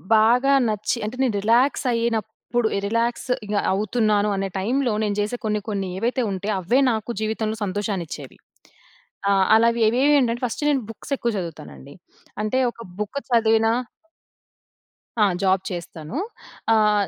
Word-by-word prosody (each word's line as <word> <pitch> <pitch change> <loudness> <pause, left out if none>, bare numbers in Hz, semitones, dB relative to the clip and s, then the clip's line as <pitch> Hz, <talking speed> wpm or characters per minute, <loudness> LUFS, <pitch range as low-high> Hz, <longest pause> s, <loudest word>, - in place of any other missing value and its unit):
బాగా 245 +6 +4
నచ్చి 215 +2 -1
అంటే, 215 +4 -4
నేను 235 -6 +1
రిలాక్సయ్యినప్పుడు, 230 -1 +1
ఎ - - +1
రిలాక్స్ 230 +3 -1 0.2
ఇగ 205 +1 -3 0.2
అవుతున్నాను 210 0 +1
అనే 195 0 -1
టైమ్‌లో, 245 +4 0
నేను 205 -1 0
జేసే 210 +4 -1
కొన్ని, 210 -1 0
కొన్ని 195 -2 -2
ఏవైతే 245 +5 0
ఉంటయో, 195 +2 -2
అవే 235 +9 +2
నాకు 220 +1 -3
జీవితంలో 220 0 -2
సంతోషాన్నిచ్చేవి. 185 -8 -4 0.9
ఆ! - - +4 0.2
అలావి 235 +1 +3
ఏవేవి 265 +6 +4
ఏంటంటే, 240 -1 0
ఫస్ట్ 250 +5 -4
నేను 275 -3 +2
బుక్సెక్కువ 235 +2 -3
జదువుతానండి. 75 - -8 0.5
అంటే, 215 +5 0
ఒక - - -24 0.2
బుక్కు 235 +7 -3
చదివినా 225 -1 +4 1.5
ఆ! - - +5 0.2
జాబ్ 190 0 +2
చేస్తాను. 170 - -6 0.6
ఆహ్, 210 -2 +3
220 Hz, 130 wpm, -23 LUFS, 205-235 Hz, 1.5 s, ఆ